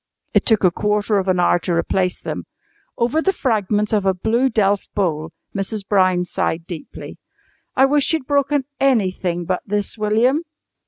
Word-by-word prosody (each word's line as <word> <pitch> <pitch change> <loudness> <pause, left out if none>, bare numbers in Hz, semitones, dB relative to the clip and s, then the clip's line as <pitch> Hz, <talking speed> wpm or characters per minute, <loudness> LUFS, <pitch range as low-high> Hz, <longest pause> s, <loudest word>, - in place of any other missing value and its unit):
It - - +2
took 220 -3 +3
a 180 - +5
quarter 210 +2 0
of 190 - -3
an 185 -1 +2
hour 175 0 +3
to 175 +1 -2
replace 180 +2 0
them. - - -5 0.5
Over 245 +7 +1
the 390 - +2
fragments 210 - 0
of 210 -2 +2
a 190 -1 +2
blue 230 +8 +1
delf 205 -3 +1
bowl 160 -6 -1 0.2
Mrs. 195 +1 -3
Brown 185 -3 +3
sighed 165 -1 -2
deeply. 170 -3 -9 0.6
"I 265 - +5
wish 285 +1 +2
you'd 320 -5 -1
broken 280 0 +1
anything 185 -9 +1
but 185 +1 -1
this, 205 +2 -3
William." 225 +8 +2
205 Hz, 165 wpm, -20 LUFS, 185-240 Hz, 0.6 s, a